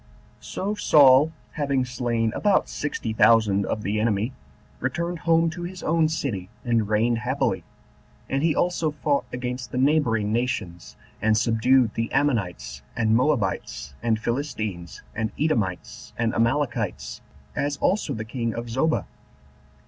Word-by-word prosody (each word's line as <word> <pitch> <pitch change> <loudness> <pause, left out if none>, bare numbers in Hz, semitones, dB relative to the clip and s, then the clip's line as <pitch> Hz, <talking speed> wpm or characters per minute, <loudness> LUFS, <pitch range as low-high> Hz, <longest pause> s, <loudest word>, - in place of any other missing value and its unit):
6. - - -14
So 200 +2 -2
Saul, 145 -7 +6 0.2
having 140 -4 0
slain 120 -2 -1
about 205 -2 +2
sixty 140 -6 -3
thousand 110 -3 +4
of 105 - -2
the 105 +2 -1
enemy, 110 +2 0 0.5
returned 170 +6 -2
home 165 0 +4
to 175 +2 -7
his 180 +1 -6
own 160 -1 +2
city, 120 - -3 0.2
and 115 -3 +1
reigned 115 +2 +2
happily: 120 -7 -1 0.6
and 135 +1 -1
he 160 -1 +2
also 170 -3 +1
fought 145 -1 0
against 125 0 -4
the - - -3
neighboring 125 -7 +2
nations, 110 -8 -3 0.3
and 110 0 +3
subdued 115 +2 +3
the 115 +1 -2
Ammonites, 120 - -1
and 110 -1 +2
Moabites, 115 - 0
and 115 -2 +1
Philistines, 110 - -4
and 110 0 -2
Edomites, 110 - -2
and 115 -1 0
Amalekites, 115 -4 -1 0.3
as 145 0 -1
also 180 -7 0
the 110 0 -5
king 115 0 -3
of 115 0 -5
Zobah. 155 +7 +1
120 Hz, 140 wpm, -24 LUFS, 110-145 Hz, 0.6 s, Saul